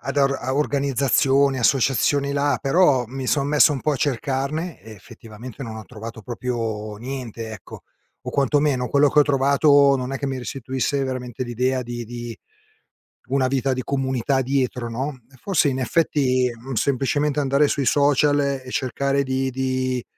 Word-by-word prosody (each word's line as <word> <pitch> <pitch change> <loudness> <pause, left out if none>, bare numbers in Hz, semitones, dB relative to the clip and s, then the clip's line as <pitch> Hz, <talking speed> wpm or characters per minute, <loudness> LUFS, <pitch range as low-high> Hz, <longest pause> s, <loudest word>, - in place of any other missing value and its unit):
ad 140 +2 -5
a 135 -2 +1
organizzazioni, 140 -1 +2
associazioni 135 +2 +2
là, 145 0 +1
però 140 -4 +3
mi 130 +2 -6
son 140 +1 +1
messo 150 0 +5
un 135 - -3
po' 155 - 0
a - - -1
cercarne 140 +5 -2
e 110 - -12
effettivamente 115 +4 -11
non 110 -2 -7
ho 110 - -8
trovato 115 -1 -9
proprio 115 -2 -4
niente, 120 -3 -6
ecco, 110 -3 -10 0.4
o - - -6
quantomeno 140 -2 +1
quello 145 +1 +4
che 150 - +1
ho - - +8
trovato 140 0 +4
non 130 +1 -4
è 135 - -3
che 140 - -3
mi 135 -1 -3
restituisse 130 +2 -2
veramente 130 -2 -4
l'idea 125 +2 -1
di 120 0 -6
di 120 0 -7 0.9
una 130 0 +1
vita 135 0 0
di 130 - -2
comunità 130 0 0
dietro, 130 -2 -1
no? 130 +3 -4
Eh, 130 - -17
forse, 185 -7 +2
in 130 -1 -1
effetti, 130 -2 +1 0.3
semplicemente 140 +4 0
andare 140 +1 +3
sui 140 -3 -1
social 145 0 +3
e 135 -2 -2
cercare 140 +2 0
di 130 0 -1
di, 130 -1 -2
135 Hz, 160 wpm, -22 LUFS, 125-140 Hz, 0.9 s, ho